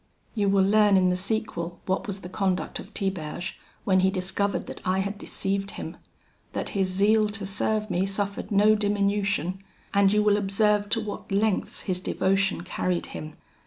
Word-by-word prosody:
"You 205 Hz, -3 st, +1 dB
will 195 Hz, -1 st, +4 dB
learn 205 Hz, 0 st, +5 dB
in 185 Hz, -1 st, +4 dB
the 180 Hz, -, +2 dB
sequel 180 Hz, -3 st, -3 dB
what 190 Hz, +5 st, -1 dB
was 200 Hz, -1 st, -5 dB
the 180 Hz, -, -7 dB
conduct 185 Hz, 0 st, -1 dB
of 195 Hz, -, -10 dB
Tiberge 185 Hz, -3 st, -3 dB, 0.2 s
when 190 Hz, -1 st, +3 dB
he 190 Hz, +1 st, +4 dB
discovered 190 Hz, +2 st, -1 dB
that -, -, -8 dB
I 185 Hz, 0 st, +1 dB
had 200 Hz, +2 st, -1 dB
deceived 195 Hz, -1 st, -2 dB
him; -, -, -6 dB, 0.6 s
that -, -, -2 dB
his 195 Hz, -3 st, 0 dB
zeal 210 Hz, +3 st, +3 dB
to 205 Hz, -1 st, -4 dB
serve 215 Hz, +2 st, -1 dB
me 180 Hz, +2 st, +1 dB
suffered 200 Hz, 0 st, -3 dB
no 210 Hz, +1 st, +5 dB
diminution; 200 Hz, -3 st, 0 dB, 0.3 s
and 200 Hz, -1 st, +5 dB
you 210 Hz, 0 st, +3 dB
will 205 Hz, -1 st, +4 dB
observe 205 Hz, +1 st, +2 dB
to 225 Hz, +1 st, +2 dB
what 210 Hz, -2 st, -6 dB
lengths 205 Hz, 0 st, 0 dB
his 185 Hz, -2 st, -1 dB
devotion 195 Hz, 0 st, +1 dB
carried 180 Hz, 0 st, -1 dB
him. 155 Hz, 0 st, -7 dB
195 Hz, 175 wpm, -26 LUFS, 185-205 Hz, 0.6 s, learn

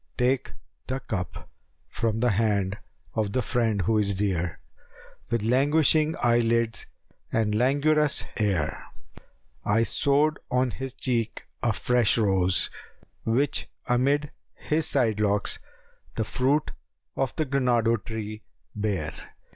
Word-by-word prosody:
Take 125 Hz, +1 st, +1 dB, 0.3 s
the 130 Hz, +1 st, -2 dB
cup 90 Hz, -8 st, -5 dB, 0.4 s
from 115 Hz, -1 st, -1 dB
the 125 Hz, -1 st, +3 dB
hand 100 Hz, -1 st, +1 dB, 0.3 s
of 105 Hz, -2 st, -1 dB
the 130 Hz, -, +1 dB
friend 115 Hz, -6 st, +1 dB
who 110 Hz, +4 st, +2 dB
is 100 Hz, -1 st, +1 dB
dear 95 Hz, -4 st, -1 dB, 0.4 s
* -, -, -22 dB
With 115 Hz, -2 st, 0 dB
languishing 150 Hz, +6 st, +3 dB
eye 120 Hz, 0 st, +4 dB
lids 115 Hz, -1 st, 0 dB, 0.4 s
and 110 Hz, -2 st, +1 dB
languorous 145 Hz, +5 st, +2 dB
air. 95 Hz, -8 st, 0 dB, 0.8 s
I 115 Hz, +3 st, +3 dB
sowed 145 Hz, +5 st, +2 dB
on 125 Hz, -1 st, +1 dB
his 135 Hz, +1 st, -6 dB
cheek 120 Hz, -4 st, -2 dB, 0.2 s
a 120 Hz, -, +2 dB
fresh 120 Hz, +1 st, +2 dB
rose, 95 Hz, -4 st, +2 dB, 0.5 s
which 130 Hz, +6 st, 0 dB, 0.2 s
amid 140 Hz, +4 st, +1 dB, 0.2 s
* -, -, -49 dB
His 155 Hz, +1 st, +2 dB
side 115 Hz, -6 st, +2 dB
locks 105 Hz, -1 st, +1 dB, 0.6 s
the 110 Hz, -, 0 dB
fruit 135 Hz, +6 st, +1 dB, 0.4 s
of 135 Hz, -3 st, -1 dB
granado 125 Hz, -7 st, +1 dB
tree 110 Hz, -1 st, -5 dB, 0.3 s
bare. 100 Hz, -7 st, -1 dB
115 Hz, 125 wpm, -26 LUFS, 105-135 Hz, 0.8 s, eye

